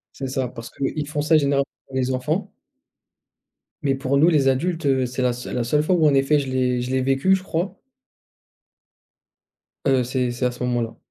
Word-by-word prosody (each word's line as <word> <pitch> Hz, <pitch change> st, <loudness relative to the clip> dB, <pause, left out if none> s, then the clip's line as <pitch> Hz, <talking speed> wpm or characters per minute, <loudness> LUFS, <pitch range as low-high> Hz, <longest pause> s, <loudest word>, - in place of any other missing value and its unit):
C'est 135 Hz, -, -4 dB
ça, 130 Hz, -1 st, -1 dB
parce 115 Hz, -1 st, -9 dB
qu'ils 145 Hz, +2 st, -3 dB
font 150 Hz, -1 st, -1 dB
ça 160 Hz, 0 st, +4 dB
généralement 140 Hz, -1 st, +1 dB, 0.2 s
pour 130 Hz, -, -10 dB
les 130 Hz, 0 st, 0 dB
enfants 130 Hz, 0 st, -2 dB, 1.3 s
mais 135 Hz, -2 st, +1 dB
pour 135 Hz, +1 st, 0 dB
nous 160 Hz, +5 st, +5 dB
les 145 Hz, -5 st, +3 dB
adultes, 165 Hz, +4 st, 0 dB
heu, 130 Hz, -2 st, +2 dB
c'est 130 Hz, +1 st, -4 dB
la 125 Hz, -1 st, +2 dB
seule 125 Hz, +1 st, -6 dB
la 120 Hz, -, 0 dB
seule 150 Hz, +5 st, +1 dB
fois 180 Hz, +3 st, +2 dB
où 160 Hz, -2 st, +3 dB
en 145 Hz, -, +4 dB
effet 135 Hz, +2 st, +3 dB
je 135 Hz, -2 st, -4 dB
l'ai 125 Hz, -1 st, 0 dB
je 125 Hz, +1 st, -4 dB
l'ai 130 Hz, 0 st, +1 dB
vécu, 135 Hz, +9 st, +3 dB
je 185 Hz, -, -5 dB
crois. 185 Hz, +2 st, -3 dB, 2.1 s
Heu 130 Hz, -2 st, +3 dB
c'est 125 Hz, -1 st, -1 dB
c'est 120 Hz, +1 st, -2 dB
à 125 Hz, -, +1 dB
ce 125 Hz, -, -7 dB
moment-là. 120 Hz, -2 st, -1 dB
135 Hz, 205 wpm, -22 LUFS, 125-150 Hz, 2.1 s, nous